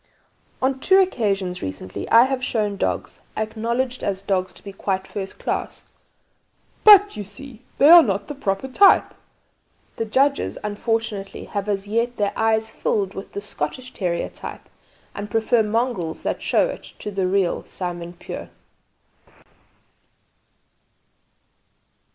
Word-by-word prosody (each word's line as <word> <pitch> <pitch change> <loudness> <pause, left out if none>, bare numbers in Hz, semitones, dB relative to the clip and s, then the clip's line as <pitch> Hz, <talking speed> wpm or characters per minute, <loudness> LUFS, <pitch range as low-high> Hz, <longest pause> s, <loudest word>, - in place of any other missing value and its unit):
On 265 0 +1
two 380 +7 +4
occasions 200 - 0
recently 95 0 -6
I 230 +1 +8
have 260 0 -1
shown 210 -5 0
dogs, - - -3 0.2
acknowledged, 235 +4 -2
as 195 -1 -2
dogs, 185 -2 0
to - - -13
be 200 - -8
quite 190 -1 -2
first 195 -1 -6
class, - - -3 1.0
'but, 410 -1 +8
you 210 - -4
see, 225 +4 -12 0.2
they 280 - +6
are 340 +2 +11
not 200 -7 -1
the - - -5
proper 200 -3 -2
type.' 390 +9 +5 0.8
The 225 - -1
judges 275 +6 +1
unfortunately 210 -2 -2
have 200 0 -4
as 200 -1 -1
yet 230 +3 -1
their 205 -1 0
eyes 220 0 +1
filled 195 -2 -1
with 195 - -9
the 200 - -4
'Scottish' 205 - -5
terrier 175 -3 -2
type - - -8 0.5
and 205 +1 -6
prefer 225 +2 +2
mongrels 215 -6 -1
that - - -2
show - - +2
it - - -6 0.2
to 210 - -6
the 190 -2 0
real 190 -2 +1
'Simon 175 -1 -5
Pure.'" 175 - -8
210 Hz, 135 wpm, -22 LUFS, 195-245 Hz, 1.0 s, are